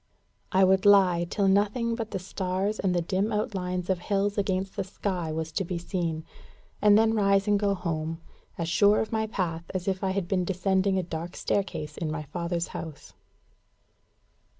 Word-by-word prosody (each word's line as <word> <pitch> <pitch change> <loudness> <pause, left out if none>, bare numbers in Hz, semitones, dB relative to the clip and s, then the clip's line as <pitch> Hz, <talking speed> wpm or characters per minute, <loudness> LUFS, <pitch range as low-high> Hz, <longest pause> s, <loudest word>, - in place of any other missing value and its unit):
I 190 +1 +4
would 190 +1 +4
lie 185 -4 +5
till 200 0 +1
nothing 210 +4 +2
but 225 -2 -4
the 200 - -3
stars 190 +2 -2
and 185 -2 +1
the 175 - +1
dim 195 +5 0
outlines 185 -4 -2
of 190 -2 0
hills 200 +2 0
against 195 -1 -1
the - - -1
sky 185 -3 -3
was 160 0 -3
to 195 - -1
be 180 0 -3
seen, 170 -3 -3 0.6
and 205 0 +6
then 225 0 +4
rise 200 -2 +3
and 205 -1 +3
go 200 -1 +1
home, 165 -2 -3 0.4
as 170 - -2
sure 205 +5 +4
of 220 - -2
my 220 -1 0
path 170 -6 -3
as 180 0 -3
if 190 -1 -1
I 190 - +1
had 190 -2 -1
been 185 -1 +1
descending 190 +1 +1
a 185 - 0
dark 170 +1 -6
staircase 195 -6 -2
in 165 - -2
my 155 0 -3
father's 170 +3 -3
house. 155 -3 -8
190 Hz, 185 wpm, -27 LUFS, 175-200 Hz, 0.6 s, and